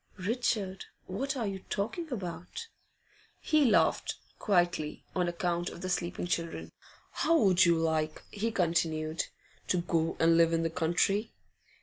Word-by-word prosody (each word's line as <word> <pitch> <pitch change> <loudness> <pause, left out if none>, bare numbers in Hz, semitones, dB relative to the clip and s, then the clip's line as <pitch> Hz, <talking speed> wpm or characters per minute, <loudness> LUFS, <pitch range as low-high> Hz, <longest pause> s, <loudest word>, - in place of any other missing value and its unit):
'Richard, 200 -2 -1 0.2
what 270 +9 -3
are 235 - -1
you 195 -1 -3
talking 275 - -2
about?' 180 - -5 0.7
He 305 -2 +3
laughed, 220 - +3 0.2
quietly, 175 -6 +1
on 180 -1 +1
account 175 0 -1
of - - -10
the 185 - -3
sleeping 175 -1 -1
children. 170 -1 -3 0.4
'How 330 - +3
would 190 - +5
you 170 -1 +4
like,' 160 -1 0
he 215 +2 -1
continued, 160 -4 0 0.4
'to 180 - +2
go 165 -1 0
and 165 0 +5
live 165 0 +5
in 165 0 +2
the 165 - 0
country? 180 +6 +1
180 Hz, 140 wpm, -30 LUFS, 165-205 Hz, 0.7 s, would